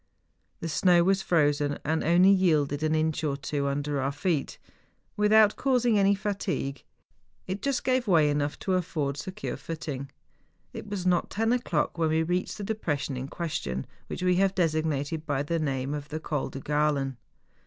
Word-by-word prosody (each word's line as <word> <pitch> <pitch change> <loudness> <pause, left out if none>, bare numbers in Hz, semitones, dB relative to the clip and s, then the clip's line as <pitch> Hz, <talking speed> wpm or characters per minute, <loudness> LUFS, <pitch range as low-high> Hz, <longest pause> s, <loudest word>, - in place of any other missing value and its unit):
The 165 - -3
snow 175 +2 +4
was 190 +1 +2
frozen, 145 -4 +1
and 160 +2 0
only 175 +4 +5
yielded 155 -7 +2
an 155 0 +1
inch 155 0 0
or 140 -2 0
two 140 0 -2
under 140 0 -1
our 135 +1 0
feet. 145 +1 -1 0.6
Without 210 0 +5
causing 245 -5 +2
any 200 0 +4
fatigue, 190 -9 -3 0.6
it 190 +2 -4
just 275 -2 -1
gave 255 -1 +1
88 - - -23
MOUNTAIN 180 -4 +5
ADVENTURES. 150 -2 +3
way 145 -1 +1
enougli 145 - -11
to 190 - 0
afford 150 -6 -1
secure 185 +5 -5
footing. 145 -4 -6 0.6
It - - -7
was 200 -3 -4
not 180 -1 +2
ten 225 +2 +1
o'clock 175 -9 -1
when 160 -1 +2
we 160 +1 +2
reached 180 +3 -2
the 205 - -5
depression 150 -10 -2
in 130 +1 -4
ques¬ 170 +2 -4
tion, 65 0 -4 0.2
which - - -5
we 180 -1 +3
have 195 0 +2
designated 155 -2 -1
by 140 -1 0
the 165 +3 -1
name 135 -2 -2
of 145 0 -5
the 155 - -4
Col 150 -3 -2
de 135 - -7
Gralen. 145 -3 0
160 Hz, 185 wpm, -27 LUFS, 145-190 Hz, 0.6 s, only